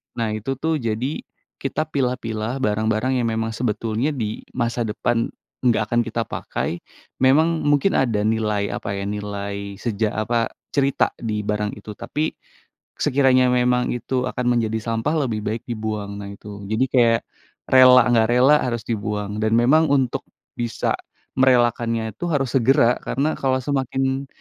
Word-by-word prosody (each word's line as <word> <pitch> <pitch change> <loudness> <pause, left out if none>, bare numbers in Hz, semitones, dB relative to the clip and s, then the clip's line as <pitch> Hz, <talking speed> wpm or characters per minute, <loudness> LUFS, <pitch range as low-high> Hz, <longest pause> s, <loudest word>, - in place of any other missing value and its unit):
Nah 115 -2 -1
itu 135 +6 -3
tuh 160 +4 0
jadi 120 +3 -2 0.4
kita 155 +3 -2
pilah-pilah 125 -3 -2
barang-barang 110 +4 +1
yang 115 - 0
memang 110 0 -1
sebetulnya 115 +4 -1
di 110 -5 -4
masa 120 -1 -1
depan 115 +2 0 0.4
nggak 115 -3 +4
akan 120 0 +3
kita 115 0 -2
pakai. 85 - -3 0.4
Memang 160 +5 +3
mungkin 145 +6 +3
ada 115 -6 +1
nilai, 105 -2 0
apa 100 - -4
ya, 100 - -3
nilai 100 -1 -4
seja 110 -2 -1
apa, 115 +1 0 0.2
cerita 140 -1 +2
di 105 -3 -2
barang 105 0 -2
itu. 105 +1 -9
Tapi 155 +7 -2 0.7
sekiranya 130 -2 +3
memang 125 0 +2
itu 125 +1 -2
akan 125 -1 -2
menjadi 110 -1 0
sampah 115 +7 -1
lebih 110 -2 -2
baik 110 +2 -2
dibuang. 105 -3 -4
Nah 100 0 -7
itu. 100 0 -10
Jadi 110 +6 +1
kayak 115 -3 +4 0.5
rela 130 -1 +7
nggak 115 -2 +3
rela 130 +5 +6
harus 120 -2 -1
dibuang, 105 -2 -3
dan 110 0 +1
memang 150 +7 +4
untuk 130 -3 +1 0.3
bisa 120 -1 -1 0.5
merelakannya 120 -3 +2
itu 175 - -5
harus 135 -6 0
segera, 125 -1 +4
karena 145 +4 -1
kalau 130 -1 +2
semakin 135 -1 -1
120 Hz, 145 wpm, -22 LUFS, 110-130 Hz, 0.7 s, rela